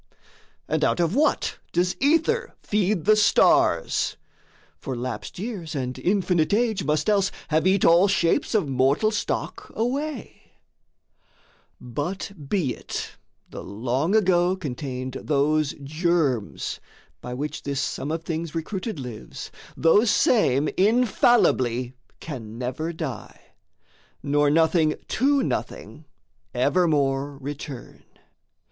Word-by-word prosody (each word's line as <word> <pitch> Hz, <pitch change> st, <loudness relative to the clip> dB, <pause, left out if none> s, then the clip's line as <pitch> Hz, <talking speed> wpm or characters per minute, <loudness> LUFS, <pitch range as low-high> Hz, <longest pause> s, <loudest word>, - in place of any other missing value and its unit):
And -, -, 0 dB
out -, -, +2 dB
of 170 Hz, +1 st, +1 dB
what 300 Hz, +3 st, +1 dB
does 180 Hz, +1 st, +1 dB
Ether 330 Hz, -, +2 dB
feed 205 Hz, -4 st, 0 dB
the 215 Hz, +1 st, +6 dB
stars? 215 Hz, -, +3 dB, 0.6 s
For 130 Hz, -, -5 dB
lapsed 125 Hz, +9 st, -5 dB
years 185 Hz, -6 st, -5 dB
and 130 Hz, -2 st, -3 dB
infinite 180 Hz, -2 st, +1 dB
age 225 Hz, -2 st, +1 dB
must 150 Hz, +1 st, 0 dB
else 200 Hz, -2 st, +2 dB, 0.2 s
Have 160 Hz, +3 st, +2 dB
eat 190 Hz, 0 st, +3 dB
all 170 Hz, +4 st, +6 dB
shapes 195 Hz, +6 st, +1 dB
of 200 Hz, -8 st, +2 dB
mortal 135 Hz, +10 st, +2 dB
stock 210 Hz, -, -3 dB
away: 270 Hz, +4 st, -4 dB, 1.3 s
But 145 Hz, +12 st, -4 dB, 0.2 s
be 165 Hz, -11 st, 0 dB
it -, -, -6 dB, 0.4 s
the -, -, -9 dB
Long 125 Hz, -, -1 dB
Ago 185 Hz, -3 st, +3 dB
contained 130 Hz, -5 st, -5 dB
those 150 Hz, 0 st, +1 dB
germs, 155 Hz, -, -1 dB, 0.4 s
By 125 Hz, 0 st, -6 dB
which 150 Hz, +4 st, -4 dB
this 140 Hz, -1 st, -3 dB
sum 140 Hz, -, -3 dB
of 165 Hz, 0 st, -3 dB
things 165 Hz, -1 st, -4 dB
recruited 185 Hz, +3 st, -4 dB
lives, 125 Hz, -5 st, -8 dB, 0.3 s
Those 205 Hz, +8 st, +4 dB
same 150 Hz, -, +3 dB
infallibly 190 Hz, -, +3 dB, 0.3 s
can 115 Hz, -8 st, -7 dB
never 130 Hz, +7 st, -3 dB
die, 160 Hz, -, -6 dB, 0.8 s
Nor 145 Hz, +1 st, +2 dB
nothing 160 Hz, 0 st, +3 dB
to 275 Hz, +3 st, +2 dB
nothing -, -, -4 dB, 0.5 s
evermore 145 Hz, -5 st, +1 dB
return. 140 Hz, -1 st, -8 dB
165 Hz, 115 wpm, -24 LUFS, 140-200 Hz, 1.3 s, the